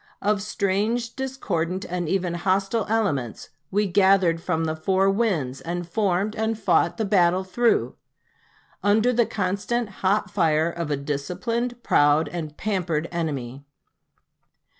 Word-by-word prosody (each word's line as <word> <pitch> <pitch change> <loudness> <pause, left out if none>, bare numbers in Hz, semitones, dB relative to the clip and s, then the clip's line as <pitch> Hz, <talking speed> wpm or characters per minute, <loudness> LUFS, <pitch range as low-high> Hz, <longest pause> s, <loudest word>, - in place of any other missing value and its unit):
Of 205 -1 +1
strange, 215 +4 -1
discordant, 190 -9 -2
and 175 -2 -3
even 180 -2 0
hostile 195 +4 0
elements 165 - -1 0.2
we 210 +2 +1
gathered 190 -3 +3
from 165 -2 -1
the 155 0 -1
four 190 +4 +2
winds, 180 - -1
and 175 +1 -4
formed 200 +2 0
and 220 0 -1
fought 175 -4 +2
the 220 - 0
battle 185 -2 +3
through, 230 +5 +1 0.9
under 220 +4 +3
the 235 -1 +2
constant 205 +4 -1
hot 200 +3 +1
fire 160 -3 +2
of 170 -2 -4
a 145 - 0
disciplined, 195 - -3
proud, 145 +2 +3
and 155 -4 -6
pampered 175 -6 -1
enemy. 140 -6 -4
190 Hz, 130 wpm, -24 LUFS, 165-215 Hz, 0.9 s, gathered